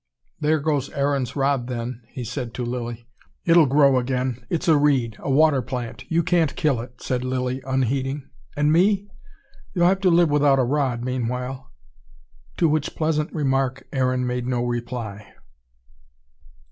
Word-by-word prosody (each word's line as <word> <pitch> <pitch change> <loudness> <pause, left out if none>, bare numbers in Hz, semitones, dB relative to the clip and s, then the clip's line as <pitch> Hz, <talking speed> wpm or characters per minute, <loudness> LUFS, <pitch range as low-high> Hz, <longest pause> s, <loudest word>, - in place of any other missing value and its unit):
"There 155 0 +2
goes 145 -2 -1
Aaron's 140 -2 -1
Rod, 135 -3 +1
then," 120 -1 -4
he 125 +1 -7
said 120 0 -5
to 125 - -3
Lilly. 120 -1 -5 0.4
"It'll 165 -3 +6
grow 140 -1 +4
again. 125 -1 -2
It's 170 +2 -2
a 160 - +6
reed, 135 -7 +2
a - - -5
water 140 0 +4
plant 120 0 -6
you 170 +1 +2
can't 165 -4 +1
kill 135 -7 +1
it," 125 +1 -12
said 125 -1 -1
Lilly, 130 0 -2
unheeding. 135 +2 -1 0.3
"And 150 +1 +3
me?" 200 +3 +2 0.6
"You'll 175 -1 +3
have 190 +2 +3
to 190 - +4
live 170 -2 +4
without 145 -2 +4
a 130 - +3
rod, 130 -2 0
meanwhile." 125 +1 -3 0.9
To - - +3
which 155 -1 -1
pleasant 155 -1 0
remark 135 -4 0
Aaron 130 -1 +1
made 125 0 -2
no 125 -1 0
reply. 120 -4 -5
130 Hz, 155 wpm, -23 LUFS, 125-150 Hz, 0.9 s, It'll